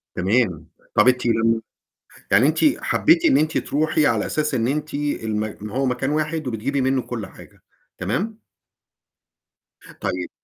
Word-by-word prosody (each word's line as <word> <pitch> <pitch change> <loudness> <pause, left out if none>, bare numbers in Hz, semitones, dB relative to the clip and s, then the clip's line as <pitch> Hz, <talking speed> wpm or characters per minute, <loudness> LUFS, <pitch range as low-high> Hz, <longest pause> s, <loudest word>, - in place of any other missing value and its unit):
تمام. 90 -4 0 0.3
طَب - - +5
أنتِ 125 -1 +3
لم 115 -1 +2 0.7
يعني 110 +8 +5
أنتِ 155 - +1 0.2
حبيتِ 335 +2 +3
إن 295 -4 +5
أنتِ 155 +1 +1
ترُوحي 155 0 +1
على - - +1
أساس 150 -1 -1
إن 120 -2 +1
أنتِ 150 +3 -2
الم 110 -7 -3
هو 135 +6 -1
مكان 125 +1 -1
واحد 155 0 -1
وبتجيبي 130 +4 -1
منه 130 0 +1
كل 120 -4 -5
حاجة. - - -16 0.4
تمام؟ 190 - -3 1.6
طيب - - -3
130 Hz, 140 wpm, -22 LUFS, 115-150 Hz, 1.6 s, طَب